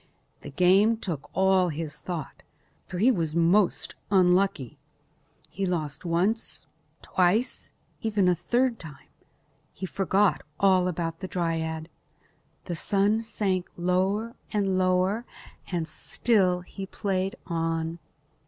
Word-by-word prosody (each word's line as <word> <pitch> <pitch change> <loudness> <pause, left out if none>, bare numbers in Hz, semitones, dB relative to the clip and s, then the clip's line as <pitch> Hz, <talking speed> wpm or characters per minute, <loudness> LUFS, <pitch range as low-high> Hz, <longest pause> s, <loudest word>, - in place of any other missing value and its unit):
The - - -8
game 190 +9 +4
took 170 -10 -5
all 190 -1 +3
his 155 -1 -5
thought, 170 -5 -6 0.5
for 180 - -5
he 230 +8 +5
was 165 -8 -1
most 175 +3 +2 0.2
unlucky. 180 - +2 0.7
He 195 0 -3
lost 155 -4 -3
once, 175 +7 0 0.4
twice, 190 +7 +1 0.3
and - - -9
even 205 -4 +2
a 180 - +5
third 240 +7 0
time. 150 -5 -10 0.6
He 190 - -6
forgot 195 +2 +1 0.2
all 185 -2 +4
about 165 -2 -3
the 185 - -5
dryad. 160 -3 -2 0.8
The 175 - -3
sun 205 +5 +1
sank 195 -5 -1
lower 190 +6 0 0.2
and 200 -3 +1
lower 185 +4 +2 0.5
and 170 -3 -1
still 180 +2 +1
he 195 +2 -8
played 190 -1 -2
on. 165 -1 -2
185 Hz, 120 wpm, -27 LUFS, 170-200 Hz, 0.8 s, he